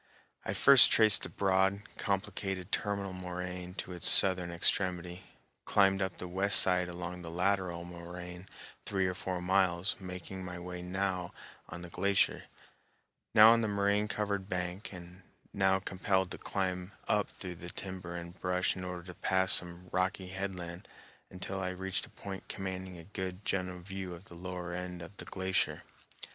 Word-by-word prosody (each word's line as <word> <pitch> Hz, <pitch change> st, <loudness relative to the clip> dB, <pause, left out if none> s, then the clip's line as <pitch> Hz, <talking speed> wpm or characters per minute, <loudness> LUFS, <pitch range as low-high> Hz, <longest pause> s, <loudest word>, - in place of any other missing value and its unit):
I -, -, -2 dB
first 140 Hz, -3 st, +8 dB
traced 110 Hz, -2 st, +5 dB
the -, -, -3 dB
broad, 95 Hz, +1 st, +1 dB
complicated 95 Hz, -2 st, -2 dB
terminal 100 Hz, -2 st, -1 dB
moraine 90 Hz, 0 st, -6 dB
to 95 Hz, -, -5 dB
its 90 Hz, -, +4 dB
southern 90 Hz, -2 st, +7 dB
extremity, 90 Hz, 0 st, +2 dB, 0.4 s
climbed 95 Hz, -1 st, +3 dB
up 95 Hz, -2 st, -2 dB
the 90 Hz, -, -6 dB
west 95 Hz, +3 st, +6 dB
side 90 Hz, -1 st, +3 dB
along 90 Hz, 0 st, -6 dB
the 85 Hz, -, -7 dB
lateral 90 Hz, -1 st, -1 dB
moraine 90 Hz, +1 st, -9 dB, 0.4 s
three 95 Hz, -2 st, 0 dB
or 90 Hz, -, 0 dB
four 90 Hz, 0 st, -4 dB
miles, 95 Hz, -1 st, +2 dB
making 95 Hz, 0 st, -7 dB
my 90 Hz, -1 st, -6 dB
way 90 Hz, 0 st, -6 dB
now 90 Hz, -1 st, -2 dB, 0.3 s
on 85 Hz, +1 st, -7 dB
the 90 Hz, -, -8 dB
glacier, 100 Hz, +2 st, +1 dB, 0.9 s
now 110 Hz, +1 st, +10 dB
on 115 Hz, -, +2 dB
the 110 Hz, -, 0 dB
moraine 100 Hz, +1 st, +1 dB
covered 100 Hz, -2 st, -2 dB
bank, 90 Hz, +2 st, -3 dB
and 90 Hz, 0 st, -11 dB, 0.3 s
now 95 Hz, -1 st, +3 dB
compelled 95 Hz, 0 st, 0 dB
to -, -, -6 dB
climb 95 Hz, 0 st, -3 dB
up 105 Hz, -1 st, +1 dB
through 90 Hz, -2 st, -7 dB
the 90 Hz, -, -6 dB
timber 90 Hz, -2 st, -6 dB
and 85 Hz, +1 st, -8 dB
brush 90 Hz, 0 st, 0 dB
in 90 Hz, -, -6 dB
order 90 Hz, -1 st, -5 dB
to 90 Hz, +1 st, -9 dB
pass 95 Hz, +1 st, +2 dB
some 90 Hz, +1 st, 0 dB
rocky 95 Hz, 0 st, -1 dB
headland, 90 Hz, -2 st, -5 dB, 0.4 s
until 95 Hz, +1 st, -5 dB
I 90 Hz, -, -1 dB
reached 95 Hz, +1 st, -3 dB
a -, -, -18 dB
point 95 Hz, -1 st, -8 dB
commanding 95 Hz, -1 st, -5 dB
a 85 Hz, -, -10 dB
good 95 Hz, +1 st, -6 dB
general 90 Hz, -1 st, -2 dB
view 95 Hz, -1 st, -6 dB
of 90 Hz, +3 st, -14 dB
the -, -, -14 dB
lower 90 Hz, 0 st, -6 dB
end 90 Hz, -1 st, -5 dB
of 100 Hz, +4 st, -12 dB
the -, -, -8 dB
glacier. 95 Hz, -1 st, -1 dB
95 Hz, 165 wpm, -32 LUFS, 90-95 Hz, 0.9 s, now